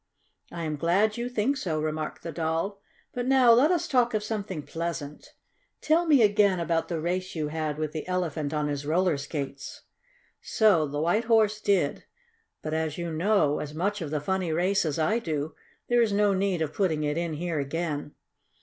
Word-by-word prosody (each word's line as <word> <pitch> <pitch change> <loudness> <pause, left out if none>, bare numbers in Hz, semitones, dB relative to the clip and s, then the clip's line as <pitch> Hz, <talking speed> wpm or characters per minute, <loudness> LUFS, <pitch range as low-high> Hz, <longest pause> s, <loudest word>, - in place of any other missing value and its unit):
"I 170 -1 -5
am 155 -2 -2
glad 195 +8 +2
you 240 +1 -3
think 250 +4 0
so," 165 -11 -2
remarked 155 0 -3
the 165 - -5
Doll. 165 +6 -2 0.3
"But 245 0 -3
now 260 -3 +6
let 250 +7 +6
us 350 -3 +1
talk 245 -3 +2
of 210 - 0
something 205 -7 -4
pleasant. 160 -2 -6 0.4
Tell 330 +2 +2
me, 285 -7 +6
again, 205 -3 +3
about 165 -1 0
the 170 -2 -3
race 180 +3 -2
you 155 -2 -2
had 155 -1 -3
with 155 -1 -2
the 155 +1 -6
Elephant 165 -5 -2
on 150 -1 -1
his 145 -1 -3
roller 170 +3 +2
skates." 140 -1 -6 0.6
So 195 -9 +3
the 145 +1 -4
White 175 +9 +1
Horse 215 -2 +3
did, 185 -9 +1 0.6
but 155 - -3
as 160 -1 -1
you 170 -1 -3
know 165 -3 +2
as 150 0 -6
much 200 +5 -1
of 160 - -4
that 150 -1 -2
funny 185 +2 -1
race 185 +4 +1
as 150 -3 -1
I 215 +9 +1
do, 155 -6 -3 0.3
there 240 0 +3
is 225 -3 +2
no 205 0 +3
need 190 -3 0
of 155 -1 -4
putting 160 -6 0
it 150 0 0
in 170 -1 -2
here 165 0 -2
again. 150 0 -3
170 Hz, 195 wpm, -27 LUFS, 155-205 Hz, 0.6 s, now